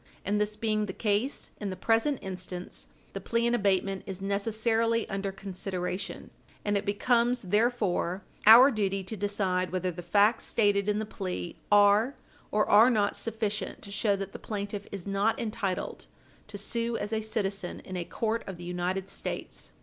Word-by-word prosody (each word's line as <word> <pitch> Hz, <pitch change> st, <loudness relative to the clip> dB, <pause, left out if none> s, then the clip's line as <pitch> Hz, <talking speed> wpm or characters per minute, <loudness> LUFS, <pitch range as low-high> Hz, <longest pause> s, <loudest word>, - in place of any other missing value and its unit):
And 210 Hz, +1 st, +1 dB
this 210 Hz, 0 st, 0 dB
being 215 Hz, -1 st, 0 dB
the 190 Hz, -, -5 dB
case 215 Hz, +7 st, -1 dB
in 205 Hz, -, -3 dB
the 185 Hz, -, -4 dB
present 225 Hz, +8 st, +2 dB
instance, 180 Hz, -1 st, -6 dB, 0.3 s
the -, -, -5 dB
plea 230 Hz, 0 st, 0 dB
in 235 Hz, -, +2 dB
abatement 195 Hz, -3 st, +1 dB
is 190 Hz, -1 st, -5 dB
necessarily 225 Hz, +3 st, 0 dB
under 195 Hz, 0 st, -2 dB
consideration, 185 Hz, -1 st, -5 dB, 0.3 s
and 205 Hz, 0 st, +1 dB
it 200 Hz, +1 st, -1 dB
becomes, 240 Hz, +4 st, +2 dB
therefore, 205 Hz, -3 st, +1 dB, 0.2 s
our 245 Hz, +5 st, +10 dB
duty 195 Hz, -4 st, -1 dB
to 190 Hz, +4 st, -5 dB
decide 190 Hz, -2 st, 0 dB
whether 185 Hz, 0 st, -1 dB
the 175 Hz, +1 st, -7 dB
facts 205 Hz, +6 st, +3 dB
stated 205 Hz, -2 st, +2 dB
in 210 Hz, -, +1 dB
the 215 Hz, -, -1 dB
plea 185 Hz, -5 st, -5 dB, 0.2 s
are 205 Hz, +5 st, +5 dB, 0.3 s
or 210 Hz, 0 st, +2 dB
are 220 Hz, +4 st, +7 dB
not 210 Hz, -4 st, +2 dB
sufficient 220 Hz, -2 st, -2 dB
to 200 Hz, -, -7 dB
show 205 Hz, 0 st, +2 dB
that 195 Hz, -1 st, -5 dB
the -, -, -7 dB
plaintiff 205 Hz, -1 st, -5 dB
is 195 Hz, -3 st, -6 dB
not 200 Hz, +3 st, +1 dB
entitled 210 Hz, -4 st, -3 dB, 0.4 s
to 210 Hz, -1 st, -7 dB
sue 230 Hz, +3 st, -2 dB
as 210 Hz, -, -4 dB
a 220 Hz, -, 0 dB
citizen 200 Hz, -4 st, -2 dB
in 185 Hz, -, -8 dB
a 180 Hz, -, -2 dB
court 225 Hz, +5 st, -2 dB
of 190 Hz, -3 st, -6 dB
the 175 Hz, -, -9 dB
United 180 Hz, +2 st, -2 dB
States. -, -, -5 dB
205 Hz, 170 wpm, -29 LUFS, 195-220 Hz, 0.4 s, our